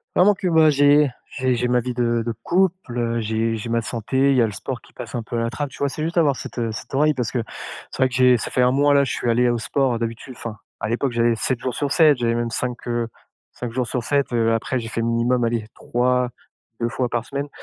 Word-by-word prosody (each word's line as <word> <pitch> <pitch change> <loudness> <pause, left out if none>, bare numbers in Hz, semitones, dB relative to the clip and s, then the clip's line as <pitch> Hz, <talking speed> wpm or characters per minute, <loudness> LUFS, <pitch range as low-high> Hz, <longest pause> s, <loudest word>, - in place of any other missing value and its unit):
vraiment 200 +3 +6
que 185 -1 -3
moi 160 -2 +5
j'ai 145 0 +5 0.3
j'ai 130 -1 +1
j'ai 125 +1 0
ma 125 0 +3
vie 125 +1 -3
de 120 -1 +1
de 115 - -1
couple, 185 -7 0
heu, 115 -1 0
j'ai 110 +1 0
j'ai 110 +2 -6
ma 115 0 +1
santé, 125 +4 0
il 130 - +3
y - - +5
a 115 - +5
le 105 - -3
sport - - -5
qui - - -21
passe - - -8
un 115 - -2
peu 120 +1 -4
à - - 0
la 115 - 0
trappe, 145 +1 -3
tu 125 - -14
vois? 140 -1 +1
C'est 155 - -5
juste 170 +2 -3
avoir 145 -5 +4
cette, - - -8
heu, 115 -2 -1
cette 110 - -8
oreille 150 +2 +4
parce 125 -5 -2
que 120 -3 -1 0.5
c'est - - -5
vrai 130 - +3
que 125 - -6
j'ai 125 -1 +5
ça - - -4
fait 125 - +2
1 125 0 +4
mois 145 +2 +3
là, 140 0 +5
je 135 - -2
suis 120 - -1
allé 120 +1 +3
au 120 - +1
sport, 130 -1 0
d'habitude 115 +3 -5
enfin, 115 -2 -6 0.2
à 105 - -3
l'époque, 120 +3 0
j'y 120 - -3
allais 115 0 +3
7 120 +2 -1
jours 130 -2 -3
sur 145 -2 -2
7, 155 -5 +5
j'allais 115 -1 0
même 120 0 -1
5, 125 0 -3
heu, 120 -1 -1 0.4
5 120 -2 -6
jours 125 0 -1
sur 125 -3 -2
7, 140 0 0
heu, 115 -1 +2
après 120 +3 -1
j'ai 115 - -6
fait 115 - -2
minimum 120 +2 +1
allez, 115 -2 0
3-2 125 -1 -2
fois 125 0 -1
par 120 -1 -2
semaine. 140 +3 -4
125 Hz, 275 wpm, -22 LUFS, 115-140 Hz, 0.5 s, vraiment